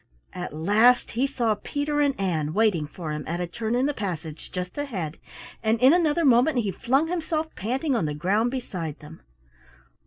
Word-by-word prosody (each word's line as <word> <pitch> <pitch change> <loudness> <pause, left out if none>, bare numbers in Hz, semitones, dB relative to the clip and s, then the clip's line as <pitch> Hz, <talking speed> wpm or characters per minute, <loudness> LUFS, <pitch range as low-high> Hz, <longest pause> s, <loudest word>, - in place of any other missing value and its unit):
At 180 -1 -5
last 215 +10 +4
he 250 +4 +1
saw 240 -5 0
Peter 290 +7 -2
and 280 -5 +1
Ann 160 -5 -1
waiting 205 -9 +2
for 160 0 -6
him 150 0 -4
at 170 +2 -2
a 180 - -1
turn 220 +7 -3
in 255 +2 +2
the 290 - 0
passage 170 - -5
just 180 0 -5
ahead, 195 - -4 0.4
and 220 0 +1
in 260 +5 +7
another 335 -2 +2
moment 255 +3 +4
he 210 -5 +1
flung 270 +10 +1
himself 320 -2 -2
panting 260 - -1
on 195 - +1
the 150 -1 -2
ground 200 +9 +1
beside 180 - -4
them. 155 +1 -13
220 Hz, 185 wpm, -25 LUFS, 175-270 Hz, 0.4 s, in